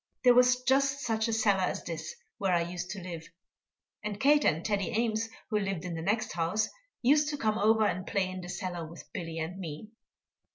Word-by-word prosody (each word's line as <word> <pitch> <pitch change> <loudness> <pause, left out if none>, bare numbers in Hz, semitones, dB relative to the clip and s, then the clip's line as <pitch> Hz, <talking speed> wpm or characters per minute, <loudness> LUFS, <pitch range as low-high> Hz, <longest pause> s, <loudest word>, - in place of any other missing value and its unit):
There 250 -1 +8
was 250 0 +5
just 275 +2 +2
such 220 -2 0
a 230 - -1
cellar 215 -3 +3
as - - -3
this 160 -1 -5 0.2
where 195 -2 +1
I 170 - +3
used 175 +1 -5
to 200 -1 -5
live, 170 -2 -7 0.7
and 210 -1 -4
Kate 290 +3 +5
and 160 +2 +2
Teddy 200 -2 0
Ames, 225 -1 0 0.2
who 210 - +2
lived 195 -4 -2
in 180 - -4
the 165 - -4
next 210 +6 0
house, 175 +6 0 0.3
used 295 +4 +4
to 295 - -3
come 215 -4 0
over 220 +1 +4
and 185 -2 -1
play 195 -3 +1
in 185 0 -6
the 175 - -8
cellar 180 -2 -4
with 165 +1 -11
Billy 165 -2 -5
and 165 +4 -4
me. 165 +3 -6
200 Hz, 210 wpm, -30 LUFS, 175-225 Hz, 0.7 s, There